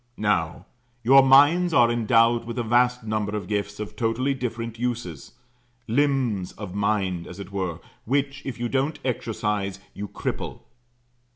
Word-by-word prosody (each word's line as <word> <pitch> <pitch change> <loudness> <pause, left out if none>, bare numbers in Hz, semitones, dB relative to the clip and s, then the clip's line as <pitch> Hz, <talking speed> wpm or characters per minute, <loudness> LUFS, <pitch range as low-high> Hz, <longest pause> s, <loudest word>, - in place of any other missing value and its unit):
Now, 85 -6 0 0.4
your 135 +4 +7
minds 145 +6 +5
are 120 -1 +5
endowed 115 0 +3
with 115 +1 -6
a 120 - 0
vast 125 +2 +2
number 110 -1 -2
of 100 - -5
gifts 105 -1 -3
of 105 - -6
totally 120 +4 0
different 115 -3 -5
uses 120 - -4 0.5
limbs 125 -6 0
of 100 -4 -8
mind 100 -4 -1
as 90 - -10
it 100 - -8
were, 95 -4 -3 0.3
which, 140 +2 -1
if 130 -3 -6
you 120 - -1
don't 135 +5 -1
exercise, 105 -5 -2
you 105 +1 -6
cripple. - - -5
115 Hz, 150 wpm, -24 LUFS, 100-125 Hz, 0.5 s, your